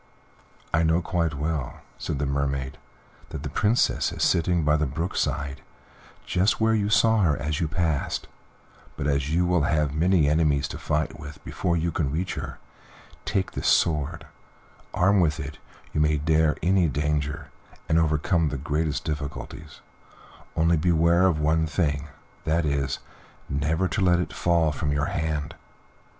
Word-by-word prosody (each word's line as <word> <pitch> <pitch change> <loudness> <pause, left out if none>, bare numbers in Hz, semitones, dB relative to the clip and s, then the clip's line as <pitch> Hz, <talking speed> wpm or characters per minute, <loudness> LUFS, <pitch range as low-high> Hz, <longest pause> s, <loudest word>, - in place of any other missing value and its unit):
"I 80 - +3
know 80 +1 +3
quite 85 -4 -1
well," 75 -2 -3 0.2
said - - -3
the 70 - -1
Mermaid, 70 -1 -2 0.5
"that - - -6
the - - -4
Princess 110 +4 +2
is - - -3
sitting 85 0 +2
by 75 0 +3
the 75 -1 +1
brook 80 +8 -3
side, 70 -1 -2 0.6
just 95 +4 +1
where 110 0 +3
you 105 -2 +1
saw 110 +2 +4
her 80 -6 +2
as 75 +2 -2
you 80 - 0
passed, 80 -2 -1 0.7
but - - -3
as 70 0 0
you 85 +2 +2
will 90 -2 +2
have 75 -1 +1
many 85 0 +3
enemies 75 -2 +2
to - - -6
fight 75 0 -1
with 75 0 -9
before 85 -1 -1
you 85 +1 0
can 75 -3 -1
reach 90 +5 -2
her, - - -6 0.7
take 95 -1 -1
this - - -3
sword; 80 0 +1 0.7
armed 95 +2 +3
with 80 -2 +1
it 75 -1 -6 0.3
you 75 - +1
may 75 0 +3
dare 80 +1 +2
any 90 -1 +3
danger, 75 +1 -2 0.4
and 80 +1 +3
overcome 80 +1 +1
the 70 - -3
greatest 75 +2 -1
difficulties, 75 0 -6 0.7
only 80 +1 +3
beware 85 +2 +3
of 80 -5 +1
one 80 +1 +2
thing 75 -3 -1 0.4
that 80 +1 +1
is, 70 -2 0 0.5
never 80 +6 0
to 90 - -1
let 90 -2 +4
it 90 - -3
fall 85 -3 +2
from 75 0 -2
your 75 0 0
hand. 75 -2 -2
80 Hz, 160 wpm, -25 LUFS, 75-85 Hz, 0.7 s, saw